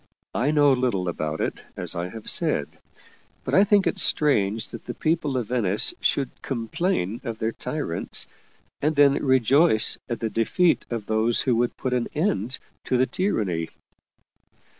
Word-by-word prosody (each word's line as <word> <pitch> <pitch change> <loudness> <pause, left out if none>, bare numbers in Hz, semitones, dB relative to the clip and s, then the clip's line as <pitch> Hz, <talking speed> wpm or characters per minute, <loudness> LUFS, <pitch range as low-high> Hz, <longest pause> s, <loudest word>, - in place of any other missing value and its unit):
I 130 +5 0
know 145 -2 +4
little 125 -8 0
about 80 -2 -3
it, - - -3
as - - -3
I 85 +1 -3
have 110 +2 -10
said - - +2 0.8
but - - -4
I 195 - +6
think 205 -1 +3
it 195 - -1
strange 110 - +2
that - - -10
the - - -5
people 155 -4 0
of 120 -4 -3
Venice 110 - +2
should 135 -3 0
complain 120 - -2
of 115 -4 -5
their 110 +1 -1
tyrants, 145 - -1 0.6
and 155 +2 +1
then 140 -1 +4
rejoice 130 0 +3
at 120 - -3
the 110 -1 -2
defeat 165 +10 +1
of 115 -3 -4
those 110 +2 +2
who 125 - +1
would 120 +1 0
put 130 - -2
an 125 -1 0
end 130 - -1 0.3
to 130 - +1
the 130 - +3
tyranny 100 - -1
125 Hz, 160 wpm, -24 LUFS, 110-145 Hz, 0.8 s, I